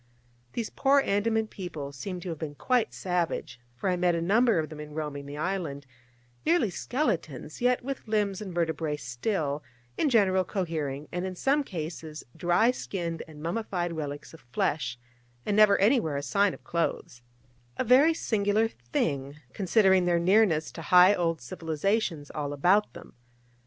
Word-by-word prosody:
These 230 - -3
poor 280 +1 +4
Andaman 220 0 +1
people 170 -9 -7
seem 180 +7 -6
to 180 - -6
have 160 -3 -5
been 150 -2 -5
quite 250 - +1
savage, 175 -8 -2 0.2
for 120 - -3
I 185 - +2
met 175 -1 +2
a - - 0
number 220 +5 +3
of 155 -1 -1
them 155 -1 -9
in 150 0 -8
roaming 145 -2 -4
the 145 +1 -7
island, 155 -5 -3 0.6
nearly 315 - +2
skeletons, 175 - -3
yet 250 0 +2
with 275 -3 -5
limbs 210 -2 0
and 200 -3 -6
vertebrae 160 -3 -1
still, 145 - -2 0.4
in 300 - +3
general, 190 -6 +3
cohering, 155 -7 -3
and 180 +1 -3
in 185 -1 -4
some 280 +9 +2
cases 160 - -6
dry 175 +7 +3
skinned 170 -9 -4
and 150 -1 -12
mummified 175 -1 -2
relics 145 -2 -6
of 160 - -13
flesh, 125 +1 -2 0.5
and 205 - 0
never 210 -1 +6
anywhere 200 - +2
a 140 - -3
sign 200 +4 +2
of - - -19
clothes: 165 -7 -2 0.6
a - - +1
very 270 +7 +5
singular 215 -3 +1
thing, 140 - -3 0.2
considering 190 -1 +3
their 175 -1 +3
nearness 175 -3 +3
to 165 - -8
high 180 +4 +7
old 165 -5 -1
civilisations 160 - -2
all 145 -2 -3
about 185 +9 +3
them. - - -12
175 Hz, 160 wpm, -28 LUFS, 150-210 Hz, 0.6 s, high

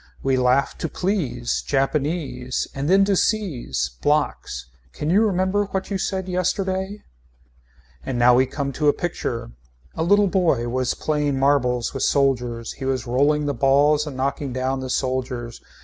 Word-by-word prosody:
We 135 -1 +2
laugh 130 +2 +2
to 165 - -2
please. 140 - -1
Japanese. 135 -2 -1
And 140 +2 -3
then 195 +1 +5
to 200 0 +2
seize. 125 - -1
Blocks. 145 - 0 0.3
Can 150 - -2
you 200 +4 +5
remember 195 0 +1
what 190 0 -4
you 195 - -1
said 190 -1 -2
yesterday. 190 +2 -1 1.0
And 125 - -3
now 120 +1 +6
we 130 +2 +4
come 140 +1 -3
to 150 +3 -1
a 145 - +6
picture. 120 - -4 0.4
A - - -4
little 205 +5 +4
boy 175 -11 +1
was 130 0 -1
playing 150 -2 -1
marbles 130 -3 +1
with 135 - -4
soldiers, 125 -4 +1
he 135 - -7
was 130 -3 -1
rolling 145 +5 +2
the 145 - 0
balls 145 +4 +3
and 135 -3 -6
knocking 140 +1 -2
down 130 +1 -1
the 130 0 -5
soldiers. 130 -2 -2
140 Hz, 160 wpm, -22 LUFS, 125-175 Hz, 1.0 s, now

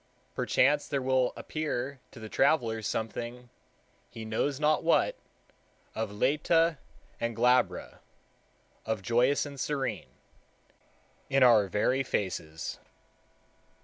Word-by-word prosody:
Perchance 145 +3 +2
there 140 - -1
will 130 -1 +1
appear 140 -3 -4
to - - -13
the 110 - -7
traveler 115 -3 +2
something, 120 +3 -4 0.6
he 115 -2 -8
knows 130 +6 -1
not 150 0 +2
what, 165 - +3 0.8
of 110 -1 -3
læta 150 +8 +2 0.4
and 115 -1 -2
glabra, 125 +2 +1 0.8
of 110 -3 -3
joyous 120 +8 +2
and 140 -1 -9
serene, 135 -7 -2 1.2
in 135 -1 +4
our 110 -5 +6
very 115 +7 +1
faces. 80 -9 -3
125 Hz, 105 wpm, -29 LUFS, 110-140 Hz, 1.2 s, our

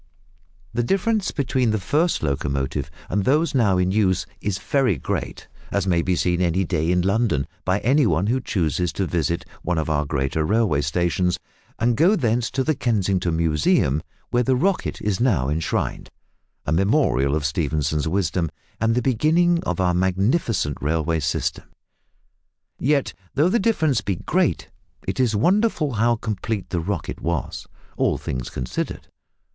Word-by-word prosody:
The 120 - +1
difference 195 - +1
between 130 -3 0
the 110 0 +1
first 155 - +1
locomotive 70 -1 -1 0.2
and 100 +1 0
those 150 - +2
now 105 -8 +3
in 90 0 +1
use 95 -3 +2 0.2
is 100 -2 -1
very 130 - +1
great - - -4 0.2
as 100 -2 0
may 85 -3 +2
be 90 +1 0
seen 90 0 +1
any 90 +2 +2
day 80 -1 -1
in 90 0 +2
London, 100 - +1 0.2
by 95 +1 +2
any 135 +2 +3
one 85 +2 +1
who 125 +5 +1
chooses 90 - -1
to 95 - -1
visit 85 -1 -1 0.2
one 90 0 -1
of 80 0 -1
our 75 -1 +1
great 70 -2 -1
railway 80 -1 +2
stations, 85 +4 0 0.4
and 120 +1 +2
go 175 - +4
thence 120 - 0
to 135 - -1
the 155 - +1
Kensington 95 - 0
Museum, 75 -3 +2 0.3
where 120 - +3
the 130 +1 +2
"Rocket" 185 +8 0
is 105 -3 0
now 95 - +2
enshrined 80 +2 -2 0.6
a - - -2
memorial 80 - +2
of 75 -2 -1
Stephenson's 75 0 0
wisdom, 85 -1 0 0.3
and 115 - +1
of - - -1
the 125 - +2
beginning 165 +7 +2
of 90 -1 -2
our 90 -1 +2
magnificent 95 - +1
railway 80 +2 0
system. 70 - -2 1.1
Yet 140 +1 +1 0.2
though 150 +5 +4
the 235 - +2
difference 160 - +2
be 100 - -1
great - - 0 0.4
it - - -2
is 120 -4 +2
wonderful 175 - +2
how 115 +2 +2
complete 110 -2 -4
the 90 - 0
"Rocket" 90 +1 -4
was, 85 0 -3 0.3
all - - +1
things 65 -2 -4
considered. 65 -1 -4
95 Hz, 160 wpm, -23 LUFS, 80-125 Hz, 1.1 s, go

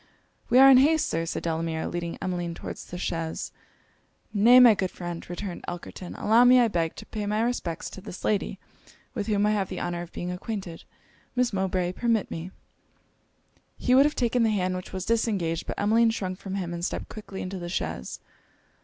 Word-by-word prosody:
'We 245 - +4
are 270 +1 +9
in 260 - +8
haste, 310 +3 +4
Sir,' 165 +1 -2
said - - -3
Delamere, 160 -1 -2
leading 170 -1 -4
Emmeline 175 -2 -3
towards - - -7
the 180 - -7
chaise. 165 -2 -3 0.8
'Nay, 230 +5 +7
my 245 -3 +9
good 190 -2 -1
friend,' 175 -2 -7
returned 175 0 -5
Elkerton, 175 +1 -7
'allow 225 +3 +4
me 250 +1 +7
I 235 -2 +4
beg 165 -4 -1
to - - -9
pay 210 -1 -4
my 210 +1 0
respects 210 -9 -2
to 190 - -9
this 185 -2 -8
lady, 205 -2 0 0.6
with 210 -4 -3
whom 205 -1 +2
I 210 - +3
have 200 -3 0
the 185 - -5
honour 175 0 -3
of 175 0 -9
being 175 0 -4
acquainted 180 -2 -6 0.5
Miss 250 -3 +1
Mowbray, 185 -2 0
permit 225 +1 0
me 165 +2 -5 0.6
' - - -41
He 250 - +1
would 270 +2 +7
have 300 - -4
taken 245 0 +1
the 225 - +4
hand 185 -3 0
which 185 - -7
was 185 -1 -4
disengaged; 200 -8 0
but - - -4
Emmeline 225 +3 +4
shrunk 185 -5 -3
from 195 -1 -5
him, 175 -3 -3
and 170 0 -5
stepped - - -3
quickly 205 -3 -7
into 185 +1 -5
the 175 0 -6
chaise. 80 - -4
190 Hz, 200 wpm, -26 LUFS, 175-225 Hz, 0.8 s, are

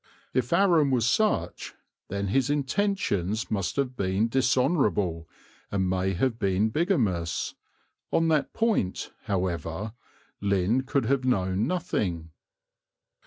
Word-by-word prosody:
If 125 -2 0
Aram 170 -7 +4
was 120 -3 +2
such, 165 - 0 0.3
then 100 0 -3
his 135 +6 +2
intentions 140 - 0
must 100 -4 -1
have 135 -2 -1
been 100 +2 0
dishonourable 125 - +1 0.4
and 95 -2 0
may 95 +1 0
have 115 +5 0
been 100 +1 +2
bigamous: 110 - 0 0.6
on 165 - +2
that 155 -3 +1
point, 220 - 0
however, 95 +1 -2 0.5
Lynn 100 +6 +1
could 140 -4 +1
have 135 +2 +1
known 95 -3 +1
nothing. 95 - -2
110 Hz, 115 wpm, -27 LUFS, 95-140 Hz, 0.6 s, Aram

